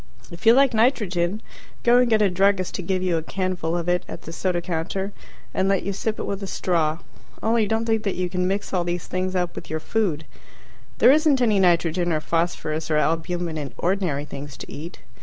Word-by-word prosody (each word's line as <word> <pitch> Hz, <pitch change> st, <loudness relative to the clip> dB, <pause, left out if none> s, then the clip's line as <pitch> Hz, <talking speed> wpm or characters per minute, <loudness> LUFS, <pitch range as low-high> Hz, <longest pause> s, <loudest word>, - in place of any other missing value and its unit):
If 170 Hz, +6 st, -5 dB
you 225 Hz, -, +9 dB
like 270 Hz, 0 st, +4 dB
nitrogen, 210 Hz, -5 st, +1 dB, 0.4 s
go 240 Hz, +1 st, +6 dB
and 250 Hz, -1 st, +3 dB
get 220 Hz, -2 st, +4 dB
a 200 Hz, -, +4 dB
druggist 190 Hz, 0 st, +2 dB
to -, -, -3 dB
give 185 Hz, +1 st, -1 dB
you 175 Hz, -3 st, +1 dB
a -, -, -1 dB
canful 175 Hz, -1 st, -2 dB
of 170 Hz, -, -5 dB
it 180 Hz, 0 st, +1 dB
at -, -, -8 dB
the 165 Hz, -, -8 dB
soda 180 Hz, 0 st, 0 dB
counter, 185 Hz, +4 st, -3 dB, 0.4 s
and 190 Hz, +1 st, +1 dB
let 195 Hz, -1 st, +1 dB
you 200 Hz, -, -2 dB
sip 215 Hz, +3 st, -2 dB
it -, -, -3 dB
with 200 Hz, 0 st, -3 dB
a 195 Hz, -, -4 dB
straw. 165 Hz, -5 st, 0 dB, 0.5 s
Only 225 Hz, -1 st, +2 dB
don't 225 Hz, +2 st, 0 dB
think 225 Hz, -1 st, +1 dB
that 200 Hz, -3 st, -2 dB
you 180 Hz, 0 st, -1 dB
can 180 Hz, 0 st, -1 dB
mix 200 Hz, +2 st, -2 dB
all 180 Hz, -2 st, +2 dB
these 175 Hz, 0 st, -3 dB
things 185 Hz, 0 st, -2 dB
up 180 Hz, -1 st, 0 dB
with -, -, -8 dB
your 160 Hz, -, -2 dB
food. 165 Hz, -5 st, -1 dB, 0.7 s
There -, -, +7 dB
isn't 300 Hz, -2 st, +4 dB
any 220 Hz, -5 st, +3 dB
nitrogen 175 Hz, -1 st, +2 dB
or 155 Hz, -, +1 dB
phosphorus 160 Hz, -1 st, -1 dB
or 155 Hz, -, +2 dB
albumen 165 Hz, +1 st, -1 dB
in 140 Hz, -3 st, -6 dB
ordinary 175 Hz, -6 st, 0 dB
things 140 Hz, 0 st, -8 dB
to -, -, -9 dB
eat. 165 Hz, +4 st, -8 dB
185 Hz, 215 wpm, -23 LUFS, 170-205 Hz, 0.7 s, you